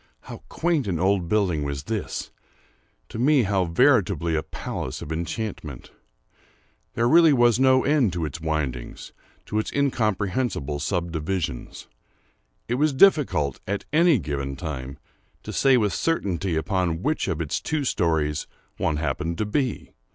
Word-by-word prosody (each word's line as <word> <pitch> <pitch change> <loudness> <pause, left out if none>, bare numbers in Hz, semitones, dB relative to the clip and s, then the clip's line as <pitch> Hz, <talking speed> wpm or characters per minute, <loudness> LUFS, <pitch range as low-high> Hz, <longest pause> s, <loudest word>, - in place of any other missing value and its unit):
—how - - -10
quaint 160 -8 0
an 90 -4 -1
old 95 -1 +1
building 95 -7 +1
was 70 -1 -3
this!—to 110 +2 -8
me 135 +1 +4
how 95 -2 +1
veritably 85 0 +2
a 80 - +1
palace 65 - -5
of 75 - -8
enchantment! 85 - -5 1.0
There 115 +1 +2
was 130 -6 +5
really - - +1
no 130 -1 +5
end 140 -8 +2
to 85 -2 -2
its 75 +2 -6
windings—to 75 - -4
its 110 - -3
incomprehensible 110 - -1
subdivisions. 85 -4 -3 0.8
It 120 - 0
was 155 -1 +3
difficult, 135 - +3
at 100 +1 -3
any 165 -1 +5
given 70 -6 -4
time, 70 -3 -6 0.5
to - - -7
say 135 -2 +4
with 105 -4 +1
certainty 95 - -1
upon 85 0 -1
which 155 - 0
of - - -2
its - - -2
two 155 -2 -1
stories 80 - 0 0.3
one 80 - 0
happened 85 +2 -2
to 110 - -1
be. 125 +3 -2
95 Hz, 135 wpm, -24 LUFS, 80-125 Hz, 1.0 s, was